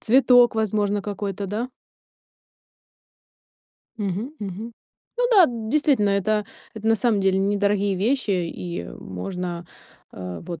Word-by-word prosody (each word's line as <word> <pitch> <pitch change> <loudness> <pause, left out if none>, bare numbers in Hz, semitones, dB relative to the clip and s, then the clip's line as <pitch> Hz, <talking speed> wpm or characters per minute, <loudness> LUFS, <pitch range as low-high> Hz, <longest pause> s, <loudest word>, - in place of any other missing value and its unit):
Цветок, 245 0 +5
возможно, 210 -1 +1
какой-то, 200 -1 -4
да? 220 +6 -3 2.3
Мгм. 205 +5 -3
Мгм. 205 +4 -6 0.5
Ну - - +3
да, 400 -6 +8
действительно, 235 -1 +1
это 210 +2 +1 0.3
это 220 0 -6
на 225 - +5
самом 225 -2 +1
деле 190 0 +2
недорогие 200 0 +1
вещи, 220 +5 0
и 175 - -3
можно, 170 - -6 0.5
э, 90 -2 -7
вот, 170 -2 -7
205 Hz, 115 wpm, -23 LUFS, 190-225 Hz, 2.3 s, да